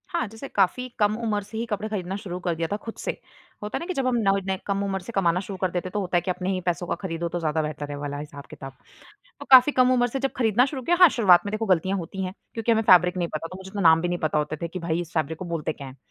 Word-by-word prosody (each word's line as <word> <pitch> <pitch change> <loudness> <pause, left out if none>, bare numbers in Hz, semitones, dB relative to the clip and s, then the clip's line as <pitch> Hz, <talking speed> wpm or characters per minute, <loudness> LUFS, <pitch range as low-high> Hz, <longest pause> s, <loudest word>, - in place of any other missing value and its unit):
हाँ। 340 -7 -1
जैसे 225 +6 -9
काफ़ी 205 +5 +1
कम 210 0 +3
उम्र 210 -2 0
से 215 +2 -9
ही 230 - -2
कपड़े 215 -2 -3
खरीदना 190 -3 -3
शुरू 180 -2 -5
कर 175 -1 -1
दिया 165 0 -2
था - - +1
खुद 225 - -5
से। - - -2 0.5
होता 210 - -3
है - - -4
ना 335 - -5
कि 370 - -3
जब 270 -5 -1
हम 255 - +1
न - - +6 0.2
नए 190 0 0
कम 200 0 0
उम्र 195 -1 -2
से 195 - -8
कमाना 180 -3 +2
शुरू 195 0 -6
कर 185 -1 -1
देते 180 +1 -3
हैं - - -8
तो 210 - 0
होता 185 -2 0
है - - +2
कि 185 - -2
अपने 180 +1 -3
ही 185 -1 -2
पैसों 175 0 -2
का - - -1
खरीदो 170 -2 -3
तो 175 - -3
ज़्यादा 160 -1 0
बेहतर 150 -1 -5
है, 145 - -4
वो 145 - -8
वाला 145 -1 -4
हिसाब-किताब। 145 -1 -9 0.7
तो - - -8
काफ़ी 260 +2 +9
कम 255 -2 +4
उम्र 245 -1 +3
से 270 +3 -4
जब 270 0 -1
खरीदना 235 0 +3
शुरू 270 -1 -5
किया 340 +8 +2
हाँ 360 - +11
शुरुआत 195 -10 +5
में 205 - -3
देखो 215 +1 -2
गलतियाँ 190 0 +1
होती 190 +2 -5
हैं, 185 0 -4 0.2
क्योंकि 230 0 0
हमें 220 -1 +3
फैब्रिक 180 -2 +5
नहीं 175 -1 0
पता, 155 +2 -3
तो 185 - -9
मुझे 190 0 -10
इतना 200 +1 -4
नाम 165 -2 +6
भी 175 - 0
नहीं 175 0 -1
पता 155 -1 0
होता 150 +1 -1
थे 170 - -2
कि 185 +2 -6
भई 170 0 -1
इस 170 -1 -9
फैब्रिक 160 0 -1
को 185 - -6
बोलते 165 -3 -3
क्या 140 - -9
हैं। 130 +1 -12
185 Hz, 315 wpm, -25 LUFS, 170-215 Hz, 0.7 s, हाँ